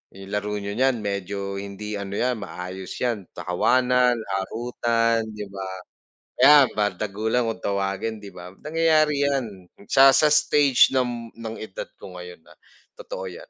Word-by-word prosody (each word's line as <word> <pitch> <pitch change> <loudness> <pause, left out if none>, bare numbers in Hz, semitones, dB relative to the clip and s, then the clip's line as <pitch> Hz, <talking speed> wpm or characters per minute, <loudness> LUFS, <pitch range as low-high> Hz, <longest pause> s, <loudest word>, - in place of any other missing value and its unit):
yung 95 0 -11
laro 105 0 -2
n'yo 100 0 -4
niyan 130 -3 +2
medyo 100 0 -4
hindi 100 +1 -6
ano 100 0 -5
'yan 125 -1 0
maayos 90 -1 -7
'yan 115 -6 -1
tawanan, 125 +7 +2
harutan, 115 +2 -1
'di 105 -1 -6
ba, 95 -1 -6 0.7
ayan 145 0 +8
bardagulan 110 +3 -1
kung 115 - -4
tawagin, 100 +2 -2
'di 100 -1 -11
ba, 90 0 -10
nangyayari 155 -2 +2
'yan 135 -3 0 0.5
sa 135 0 +8
sa 150 -1 +4
stage 145 -3 +4
nam 120 -2 -1
ng 115 -1 -7
edad 110 -3 -6
ko 90 - -11
ngayon 90 -2 -10
na - - -20 0.4
totoo 95 0 -7
'yan. 90 - -10
110 Hz, 145 wpm, -24 LUFS, 100-125 Hz, 0.7 s, ayan